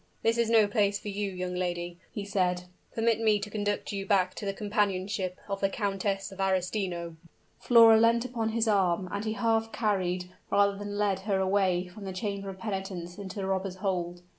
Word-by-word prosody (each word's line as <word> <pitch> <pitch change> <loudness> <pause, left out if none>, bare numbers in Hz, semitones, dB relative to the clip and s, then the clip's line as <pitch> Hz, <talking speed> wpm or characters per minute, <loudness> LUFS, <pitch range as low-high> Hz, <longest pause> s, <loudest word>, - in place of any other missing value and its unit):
"This 230 +1 +2
is 230 -1 +2
no 225 -2 +6
place 205 -1 +1
for 210 - -7
you, 200 0 -2
young 180 -1 -4
lady," 175 -1 -3
he 205 - -5
said. 180 -3 0 0.3
"Permit 225 -1 +2
me 215 -2 +3
to 205 0 -6
conduct 205 0 -2
you 200 -1 -3
back 190 -2 +2
to - - -7
the - - +1
companionship 195 -3 -1
of 195 -1 -3
the 195 - +3
Countess 195 -1 -2
of 195 - -12
Arestino." 185 -3 -1 0.4
Flora 230 -2 +7
leant 230 +1 +4
upon 235 -3 -2
his 225 0 0
arm, 190 -3 +2
and 205 +2 -3
he 215 - -1
half 225 -1 +1
carried, 185 -4 -1 0.2
rather 200 0 +3
than 205 0 -5
led 200 -2 +1
her 195 -1 +2
away 190 -2 +2
from 195 +3 -10
the 190 - -4
chamber 200 0 -3
of 190 - -7
penitence 190 -3 -5
into 190 -2 -7
the 195 -2 -3
robbers' 190 -1 -1
hold. 180 -2 -2
200 Hz, 195 wpm, -29 LUFS, 185-210 Hz, 0.4 s, Flora